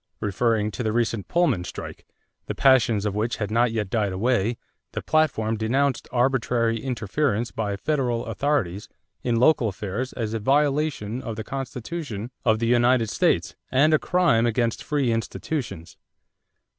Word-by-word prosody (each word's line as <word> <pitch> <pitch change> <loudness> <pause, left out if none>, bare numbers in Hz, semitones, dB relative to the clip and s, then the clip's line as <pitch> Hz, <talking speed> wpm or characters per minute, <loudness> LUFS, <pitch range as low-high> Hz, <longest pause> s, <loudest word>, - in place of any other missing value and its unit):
Referring 105 +1 0
to 105 - -5
the 110 -2 0
recent 115 -3 -1
Pullman 150 - +2
strike, - - -8 0.4
the - - -3
passions 120 -6 +4
of 105 - -1
which 110 +3 -1
had 105 -1 -4
not 120 +1 +3
yet 105 -4 -2
died 105 -4 +1
away, 115 +3 +1 0.4
the - - -3
platform 135 -9 +1
denounced 130 +5 0
"arbitrary 120 -2 +1
interference 120 -1 -1
by 105 -2 -2
federal 125 0 -1
authorities 115 -5 -1 0.3
in 120 -1 0
local 125 0 +4
affairs 105 +5 -4
as 110 -3 -3
a 115 - -1
violation 140 -2 +1
of 115 - -5
the 110 - -5
Constitution 130 -3 -5
of 110 -2 +3
the 115 - -1
United 120 -1 +3
States - - +1
and 145 +5 +4
a 155 - +5
crime 165 -11 +2
against 115 0 0
free 140 -5 0
institutions." 115 - -4
115 Hz, 150 wpm, -24 LUFS, 110-135 Hz, 0.4 s, a